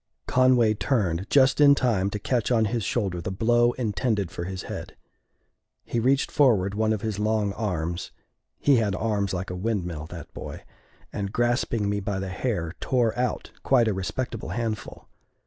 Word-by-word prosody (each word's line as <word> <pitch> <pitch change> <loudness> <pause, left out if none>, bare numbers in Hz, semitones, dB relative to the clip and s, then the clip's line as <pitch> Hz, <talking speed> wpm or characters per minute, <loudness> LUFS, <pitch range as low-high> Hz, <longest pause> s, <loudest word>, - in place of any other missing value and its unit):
Conway 125 -4 +4
turned 100 -4 -1
just 135 +1 +4
in 140 -1 +8
time 110 -8 +1
to 105 - -3
catch 120 +2 -1
on 115 -2 +3
his 115 +1 -1
shoulder 95 -4 -1
the 85 - -4
blow 120 +5 +2
intended 105 -4 -1
for 85 - -5
his 95 0 -5
head. - - -7 0.9
He 120 - -1
reached 135 +4 +2
forward 105 -9 +3
one 110 +1 +1
of 110 -2 -1
his 110 -2 -2
long 105 -1 +1
arms 90 -5 -3 0.5
he 140 -3 +4
had 105 -4 +1
arms 100 -2 -1
like 90 0 -3
a - - -4
windmill, 90 -6 -3
that 85 -2 -10
boy - - -8 0.5
and, 100 -1 -3
grasping 120 -2 0
me 100 0 0
by 100 0 -3
the 95 0 -3
hair, 90 -4 -2
tore 120 -4 +1
out 125 0 -2
quite 125 -4 +3
a 110 - +1
respectable 95 +7 -4
handful. 115 -3 -4
105 Hz, 170 wpm, -25 LUFS, 95-120 Hz, 0.9 s, in